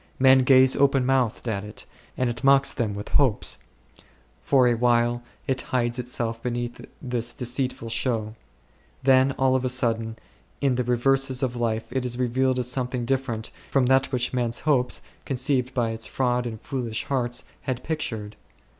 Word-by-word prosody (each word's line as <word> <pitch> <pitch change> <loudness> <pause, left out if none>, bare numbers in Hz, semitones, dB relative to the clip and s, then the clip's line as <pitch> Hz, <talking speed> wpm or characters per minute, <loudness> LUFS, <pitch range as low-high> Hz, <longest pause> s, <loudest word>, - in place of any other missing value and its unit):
Men 130 0 +6
gaze 130 0 +5
open 135 -2 +3
mouthed 130 -3 +1
at 100 -3 -2
it, 105 0 -7 0.3
and 130 - +1
it 120 +2 -4
mocks 135 0 +5
them 110 -6 -2
with 105 - -6
hopes; 130 -7 +2 0.8
for 130 -3 +4
a 120 - +4
while 120 0 +2 0.2
it 130 -1 -1
hides 120 -2 0
itself 115 -2 -3
beneath 120 0 -3 0.2
this 120 -1 -3
deceitful 125 -1 -3
show; 115 -2 -1 0.7
then 130 +1 +4
all 130 0 +2
of 130 - 0
a 130 - 0
sudden 115 -3 -1 0.4
in 140 -2 +2
the 125 0 0
reverses 130 +2 +1
of 125 -2 -1
life 115 -2 -1
it 130 0 -1
is 125 -1 -1
revealed 130 +1 +1
as 125 -1 -1
something 125 -1 -2
different 120 -4 -2 0.2
from 135 -2 +2
that 130 +1 +3
which 125 -1 -1
men's 120 -2 -1
hopes, 135 -4 +1 0.2
conceived 130 -1 0
by 120 -3 +1
its 115 0 -3
fraud 125 -1 0
in 110 -2 -5
foolish 120 -2 -3
hearts, 125 -3 -2 0.2
had 130 -1 -4
pictured. 110 -10 -4
125 Hz, 165 wpm, -25 LUFS, 120-130 Hz, 0.8 s, Men